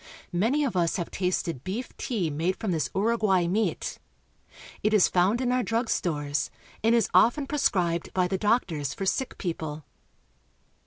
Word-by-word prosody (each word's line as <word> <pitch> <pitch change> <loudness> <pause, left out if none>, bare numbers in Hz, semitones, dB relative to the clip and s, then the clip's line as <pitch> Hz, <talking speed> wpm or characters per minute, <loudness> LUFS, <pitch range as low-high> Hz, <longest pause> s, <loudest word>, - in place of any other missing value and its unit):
Many 230 +12 +2
of 260 -8 -1
us 170 -2 +1
have 175 -3 -3
tasted 175 -7 -2
beef 220 +7 -5
tea 190 -11 -2
made 165 +6 0
from 215 -2 -3
this 155 -6 0
Uruguay 205 -3 +2
meat. 205 +6 -1 0.8
It 215 +1 +2
is 200 - +6
found 190 +6 +2
in 250 -1 +1
our 250 0 +2
drug 230 +1 -1
stores, 145 -4 -1 0.3
and 225 +1 +4
is 230 - +3
often 275 +5 +4
prescribed 180 - 0
by 185 -1 +1
the 190 +1 -2
doctors 180 - 0
for 195 - -3
sick 260 +7 -1
people. 160 -4 -4
190 Hz, 160 wpm, -27 LUFS, 170-230 Hz, 0.8 s, is